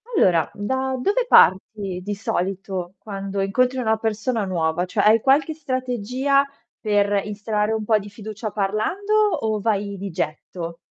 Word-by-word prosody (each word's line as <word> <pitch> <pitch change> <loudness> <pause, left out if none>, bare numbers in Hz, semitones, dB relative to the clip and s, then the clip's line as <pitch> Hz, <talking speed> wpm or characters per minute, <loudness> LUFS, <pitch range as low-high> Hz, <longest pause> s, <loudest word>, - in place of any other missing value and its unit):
Allora, 175 - +3
da 260 +6 -2
dove 415 - +1
parti 190 - +4
di 205 +2 -3
solito 190 -2 -3
quando 195 -1 -4
incontri 250 +7 +1
una 220 -3 +1
persona 220 +1 -1
nuova? 170 -2 0
Cioè 200 +3 -1
hai 220 +1 +6
qualche 285 +4 +3
strategia 260 -1 0 0.4
per 205 -2 +2
instaurare 210 +1 -1
un 220 -1 -2
po' 215 0 +4
di 205 0 -9
fiducia 215 +1 -6
parlando, 215 - -1
o 395 - +2
vai 200 -2 -1
di 195 +1 -5
getto? 165 +1 -5
210 Hz, 145 wpm, -22 LUFS, 195-250 Hz, 0.4 s, hai